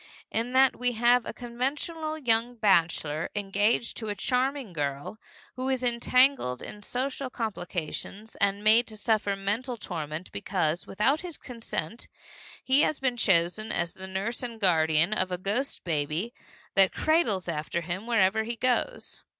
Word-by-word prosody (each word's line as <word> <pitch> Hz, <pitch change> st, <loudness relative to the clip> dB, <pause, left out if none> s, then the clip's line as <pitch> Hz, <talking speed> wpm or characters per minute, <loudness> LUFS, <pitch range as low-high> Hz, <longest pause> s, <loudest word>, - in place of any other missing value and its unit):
In 235 Hz, +3 st, -1 dB
that 265 Hz, 0 st, +5 dB
we 245 Hz, 0 st, 0 dB
have 240 Hz, +1 st, +3 dB
a -, -, -2 dB
conventional 295 Hz, +6 st, -3 dB
young 240 Hz, -3 st, +1 dB
bachelor, 165 Hz, -7 st, +2 dB
engaged 205 Hz, +3 st, +1 dB
to 220 Hz, -2 st, -4 dB
a 205 Hz, -, -2 dB
charming 255 Hz, 0 st, -1 dB
girl, 145 Hz, +6 st, -3 dB, 0.4 s
who 255 Hz, +1 st, -2 dB
is 260 Hz, -1 st, 0 dB
entangled 245 Hz, -, +3 dB
in 210 Hz, -, -8 dB
social 260 Hz, +4 st, -3 dB
complications 210 Hz, -1 st, -5 dB
and 200 Hz, 0 st, +1 dB
made 225 Hz, +3 st, +6 dB
to 215 Hz, -, -6 dB
suffer 210 Hz, -2 st, +1 dB
mental 220 Hz, +6 st, -2 dB
torment 160 Hz, -4 st, -5 dB
because, 175 Hz, -3 st, -1 dB
without 265 Hz, +10 st, +1 dB
his 345 Hz, -4 st, -6 dB
consent, 230 Hz, -, -5 dB, 0.6 s
he 265 Hz, +2 st, +5 dB
has 305 Hz, -, +1 dB
been 260 Hz, -2 st, 0 dB
chosen 195 Hz, +1 st, +2 dB
as 170 Hz, -1 st, -1 dB
the 190 Hz, 0 st, -8 dB
nurse 195 Hz, +5 st, -3 dB
and 235 Hz, -3 st, -6 dB
guardian 165 Hz, -1 st, +3 dB
of 185 Hz, -3 st, 0 dB
a 180 Hz, -, -1 dB
ghost 210 Hz, +9 st, -2 dB
baby 160 Hz, +7 st, -1 dB, 0.4 s
that 195 Hz, -1 st, +5 dB
cradles 270 Hz, -, +1 dB
after 160 Hz, +1 st, -2 dB
him 180 Hz, +6 st, -5 dB
wherever 220 Hz, -2 st, +3 dB
he 235 Hz, +2 st, -4 dB
goes. 255 Hz, -, -1 dB
220 Hz, 150 wpm, -28 LUFS, 185-250 Hz, 0.6 s, made